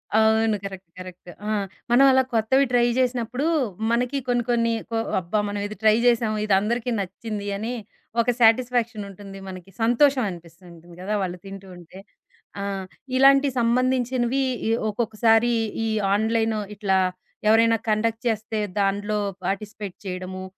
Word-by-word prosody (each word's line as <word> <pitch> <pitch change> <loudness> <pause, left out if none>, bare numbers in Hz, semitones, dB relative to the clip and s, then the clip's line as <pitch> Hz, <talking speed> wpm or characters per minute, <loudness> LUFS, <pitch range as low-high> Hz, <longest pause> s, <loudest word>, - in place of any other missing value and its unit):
అవును. 220 0 +3
Correct. 190 -3 -8
Correct. 180 -1 -10 0.2
ఆ! - - -1 0.4
మనం 245 +3 +6
అలా 260 0 +5
కొత్తవి 250 +5 +3
ట్రై 240 -1 +4
జేసినప్పుడు. 250 +2 0 0.5
మనకి 250 +4 0
కొన్ని, 245 -1 +1
కొన్ని 230 -1 +2 0.2
కొ 225 - 0 0.2
అబ్బా! 185 +5 -1
మనమిది 205 +1 -4
ట్రై 215 0 +6
జేసాము. 230 -3 +2
ఇది 205 - +1
అందరికీ 235 +4 -1
నచ్చింది 205 +2 -5
అని, 225 +4 -3 0.5
ఒక 235 - -1
సాటిస్‌ఫాక్షనుంటుంది 225 -5 +1
మనకి. 185 0 -9
సంతోషం 255 +3 +3
అనిపిస్తూ 170 0 -11
ఉంటుంది 170 +1 -15
గదా 210 +3 -2
వాళ్ళు 180 -1 -4
తింటూ 195 0 -9
ఉంటే. 175 +2 -13 0.6
ఆ! - - -3 0.5
ఇలాంటి 275 +1 +6
సంబంధించినివి 255 +1 +1 0.3
ఇ - - +2 0.2
ఒక్కొక్కసారి 225 +1 +2 0.3
ఈ - - 0 0.2
ఆన్‌లైన్ 220 +1 +1 0.2
ఇట్లా, 195 -2 +1 0.5
ఎవరైనా 225 +1 +5
కండక్ట్ 225 +2 0
చేస్తే, 220 0 -2 0.2
దాంన్లో 205 +2 0 0.3
పార్టిసిపేట్ 205 -1 -4
చేయడము, 185 0 -5
220 Hz, 130 wpm, -24 LUFS, 200-240 Hz, 0.6 s, మనం